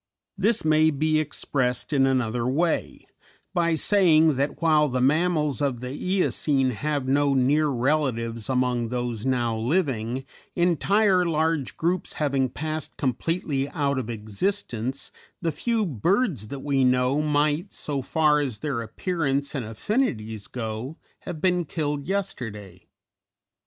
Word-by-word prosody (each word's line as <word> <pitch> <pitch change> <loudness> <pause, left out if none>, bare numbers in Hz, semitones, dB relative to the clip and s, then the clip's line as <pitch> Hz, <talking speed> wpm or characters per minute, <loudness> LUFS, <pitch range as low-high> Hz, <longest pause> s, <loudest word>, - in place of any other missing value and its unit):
This 205 0 +1
may 155 0 +4
be 155 +1 +1
expressed 135 -3 -1
in 135 -2 +4
another 120 -2 0
way, 160 +6 -1 0.5
by 170 -2 +2
saying 160 -4 +4
that 140 +2 -1
while 155 -3 +3
the 130 0 -1
Mammals 150 +1 +2
of 135 -4 0
the 125 +1 -5
Eocene 150 -6 +1
have 145 +2 -2
no 140 +1 +2
near 145 +4 +3
relatives 120 -4 -1
among 125 -2 +1
those 120 -1 -3
now 120 -3 +1
living, 130 -1 -1 0.3
entire 185 +3 +3
large 160 -4 0
groups 175 +2 -1
having 135 -3 0
passed 155 +3 -5
completely 140 +1 -1
out 140 -4 0
of 120 -3 -5
existence, 120 - -3 0.3
the 165 -2 -1
few 230 +6 0
birds 170 - 0
that 140 +3 -6
we 140 -2 +1
know 125 +3 +2
might, 150 +2 +1
so 140 -2 -3
far 150 +2 +2
as 135 -7 -2
their 135 -1 -2
appearance 140 - -2
and 135 -5 -2
affinities 110 - -2
go, 115 +4 -5 0.2
have 175 -4 -7
been 180 +1 +2
killed 145 -3 -3
yesterday. 110 - -5
145 Hz, 130 wpm, -25 LUFS, 125-160 Hz, 0.5 s, may